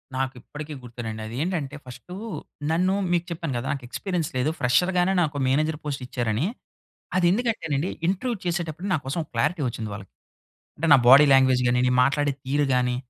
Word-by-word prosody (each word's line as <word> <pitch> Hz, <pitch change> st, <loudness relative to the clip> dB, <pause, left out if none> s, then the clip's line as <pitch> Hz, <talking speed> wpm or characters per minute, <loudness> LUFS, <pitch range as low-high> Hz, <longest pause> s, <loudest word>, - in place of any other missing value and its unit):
నాకిప్పటికీ 135 Hz, +3 st, -5 dB
గుర్తేనండి. 115 Hz, -2 st, -6 dB
అదేంటంటే 145 Hz, +4 st, -3 dB
ఫస్టూ 130 Hz, +8 st, -11 dB, 0.6 s
నన్ను 180 Hz, +3 st, +2 dB, 0.2 s
మీకు 175 Hz, -1 st, +1 dB
చెప్పాను 165 Hz, -4 st, -3 dB
గదా! 120 Hz, +2 st, -4 dB
నాకు 135 Hz, -3 st, -7 dB
ఎక్స్పీరియన్స్ 180 Hz, 0 st, -2 dB
లేదు 130 Hz, +4 st, +1 dB
ఫ్రెషర్ 125 Hz, +8 st, +3 dB
గానే 180 Hz, +2 st, +3 dB
నాకు 150 Hz, -3 st, -1 dB
మేనేజర్ 150 Hz, +3 st, +1 dB
పోస్ట్ 140 Hz, -3 st, -3 dB
ఇచ్చారని. 120 Hz, 0 st, -1 dB, 0.7 s
అదెందుకంటేనండీ 180 Hz, -, +1 dB, 0.2 s
ఇంటర్వ్యూ 235 Hz, +6 st, -1 dB
చేసేటప్పుడు 170 Hz, 0 st, -2 dB
నా -, -, +4 dB
కోసం 135 Hz, +6 st, -2 dB
ఓ -, -, -22 dB
క్లారిటీ 150 Hz, +8 st, 0 dB
ఒచ్చింది 110 Hz, -2 st, -5 dB
వాళ్ళకి. 100 Hz, -1 st, -10 dB, 0.6 s
అంటే 160 Hz, -, -1 dB
నా -, -, +7 dB
బాడీ 135 Hz, +4 st, +9 dB
లాంగ్వేజ్ 130 Hz, -1 st, +5 dB
గాని 125 Hz, 0 st, +2 dB
అండి, 125 Hz, 0 st, +2 dB
మాట్లాడే 145 Hz, +1 st, +1 dB
తీరు 145 Hz, +2 st, +1 dB
గాని 125 Hz, -1 st, +1 dB
145 Hz, 160 wpm, -25 LUFS, 125-170 Hz, 0.7 s, బాడీ